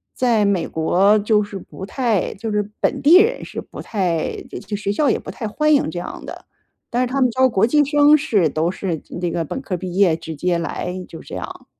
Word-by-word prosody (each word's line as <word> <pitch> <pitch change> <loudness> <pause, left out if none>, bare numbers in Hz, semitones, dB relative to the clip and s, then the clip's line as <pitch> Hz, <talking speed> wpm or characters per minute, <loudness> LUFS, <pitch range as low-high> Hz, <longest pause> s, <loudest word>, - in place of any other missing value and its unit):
在 235 -4 +2
美 195 -4 +1
国 190 +6 +3
就 210 0 +2
是 205 -1 -7
不 190 - -9
太 230 -4 -1
就 220 +2 -5
是 210 -1 0
本 - - +1
地 335 +6 +8
人 465 +4 +1
是 - - -6
不 - - -12
太 180 -6 -1 0.3
就 210 - -3
学 200 -1 -2
校 280 +7 +2
也 - - +1
不 - - -10
太 220 - -5
欢 305 +8 +2
迎 280 - +2
这 175 - -4
样 - - -7
的。 - - -9 0.5
但 245 - +1
是 250 - 0
他 275 - +1
们 255 - +4
招 260 +2 +4
国 220 -4 +2
际 295 +4 +4
生 295 +1 +5
是， 210 - +1
都 160 +4 0
是 175 -5 -4 0.2
那 175 - 0
个 165 -1 -2
本 265 - -5
科 195 -9 -3
毕 180 0 -6
业 190 -5 +4
直 160 -1 -7
接 175 +3 0
来， 170 +1 -4
就 165 - -10
这 - - -9
样。 - - -7
205 Hz, 250 characters per minute, -20 LUFS, 180-260 Hz, 0.5 s, 地